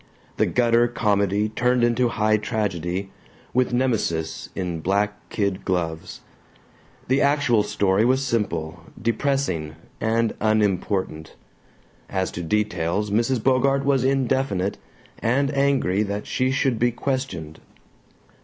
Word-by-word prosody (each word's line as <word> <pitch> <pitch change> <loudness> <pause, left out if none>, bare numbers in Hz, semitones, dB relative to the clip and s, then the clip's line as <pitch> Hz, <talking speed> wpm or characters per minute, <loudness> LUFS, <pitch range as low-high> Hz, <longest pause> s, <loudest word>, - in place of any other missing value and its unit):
The - - +2
gutter 120 -1 +3
comedy 105 -3 +1
turned 125 +2 +1
into 120 +1 +3
high 110 -1 +2
tragedy, 95 -3 -2 0.4
with 125 0 +2
Nemesis 105 -11 -1
in 90 -3 -3
black 100 +4 -1
kid 100 -2 -1
gloves. 85 -2 -3 0.9
The 130 +2 +2
actual 140 -6 +3
story 100 0 +1
was 130 +3 +2
simple, 85 -9 -2 0.2
depressing, 115 - -1 0.2
and 115 0 +1
unimportant. 100 -6 0 0.7
As 95 -1 -1
to 85 - -5
details 100 +1 -1
Mrs. 115 +2 +1
Bogart 135 +1 +2
was 135 -3 +2
indefinite, 130 -7 0 0.4
and 135 +5 +1
angry 135 -8 +2
that 105 0 -3
she 130 0 0
should 130 -3 +1
be 120 - +3
questioned. 120 - -4
110 Hz, 115 wpm, -23 LUFS, 95-125 Hz, 0.9 s, gutter